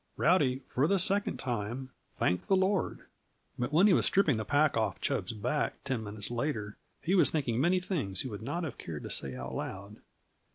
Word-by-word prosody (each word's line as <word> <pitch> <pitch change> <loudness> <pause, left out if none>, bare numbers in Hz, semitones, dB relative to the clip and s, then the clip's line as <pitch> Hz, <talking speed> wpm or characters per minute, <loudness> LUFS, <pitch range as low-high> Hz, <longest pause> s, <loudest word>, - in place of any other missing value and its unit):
Rowdy, 140 -6 +3
for 135 +4 +1
the 195 - +3
second 200 +2 +2
time, 120 +2 -3 0.3
thanked 90 0 0
the 195 - +4
Lord. 190 +1 +1 0.6
But 120 +3 -1
when 170 +6 +5
he 210 - +6
was - - +3
stripping 160 - +3
the 110 - -2
pack 145 +6 +2
off 110 -1 0
Chub's 135 -3 -1
back, 115 +7 -2
ten 130 -5 -2
minutes 105 +1 -4
later, 120 -5 -3 0.2
he 180 - +1
was 190 - +5
thinking 130 -6 0
many 180 +4 +3
things 145 - -2
he - - -4
would 105 -4 -6
not 145 +9 -3
have 150 -7 -5
cared 80 -3 -6
to - - -6
say 65 -2 -1
aloud. 95 +11 -6
130 Hz, 195 wpm, -31 LUFS, 105-170 Hz, 0.6 s, he